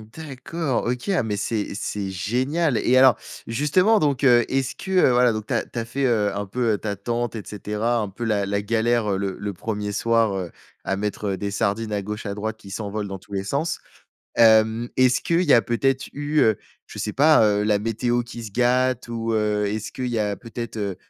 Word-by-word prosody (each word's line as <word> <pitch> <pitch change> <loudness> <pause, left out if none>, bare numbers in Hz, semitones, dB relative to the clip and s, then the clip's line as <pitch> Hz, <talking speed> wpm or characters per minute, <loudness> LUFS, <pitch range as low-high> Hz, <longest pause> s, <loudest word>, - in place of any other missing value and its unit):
D'accord. 155 -1 -3
OK, 125 +8 -2
ah 180 -10 +2
mais 105 -2 -2
c'est 105 +1 -2
c'est 100 -2 -3
génial 125 - 0
et 130 - +2
alors 130 -4 +6 0.3
justement 165 - +3
donc, 145 -2 0
heu, 120 -3 +6
est-ce 135 -1 -1
que, 190 - -8
heu, 180 -8 +5
voilà 125 -1 +4
donc 110 -1 -5
tu - - -2
as - - 0
tu - - -11
as 115 - 0
fait, 135 +4 -2
heu, 105 -5 +2
un 100 0 -3
peu 115 +1 0
ta 100 -1 -3
tente 120 +1 -3
et 110 - -4
cetera. 105 +3 -2
Un 105 - -1
peu 100 +5 -8
la 105 -3 +1
la 100 +1 -1
galère, 115 0 +1
heu, 95 - 0
le 95 -1 -2
le 100 -1 -4
1er 105 +2 -4
soir, 115 0 +2
heu, 90 -3 -5 0.3
à 95 - 0
mettre, 105 0 -3
heu, 95 - -2
des 100 +1 -3
sardines 110 +1 -1
à 100 -1 -1
gauche, 105 +2 -6
à 100 - -3
droite 110 +2 -4
qui 100 -3 -13
s'envolent 105 -1 -4
dans 95 -1 -6
tous 100 - -15
les 95 0 -1
sens. 145 +10 -2 0.6
Hem, 110 +1 +5
est-ce 130 -1 +4
qu'il 170 +2 +1
y 150 - +3
a 115 - +6
peut-être 130 +5 0
eu, 145 +1 -2
heu, 110 -3 +3 0.3
je - - -8
sais 105 - -2
pas, 150 -4 +5
heu, 105 0 +2
la 105 -1 +2
météo 120 +2 0
qui 120 -1 -9
se 100 - -8
gâte 125 +1 +1
ou, 115 -1 -2
heu, 105 -1 +1
est 105 +2 -2
ce 110 - -7
qu'il 130 -1 -4
y 120 -2 -1
a 105 -1 0
peut 115 - -13
être, 115 -1 -4
heu, 100 -3 -3
115 Hz, 235 wpm, -23 LUFS, 105-125 Hz, 0.6 s, alors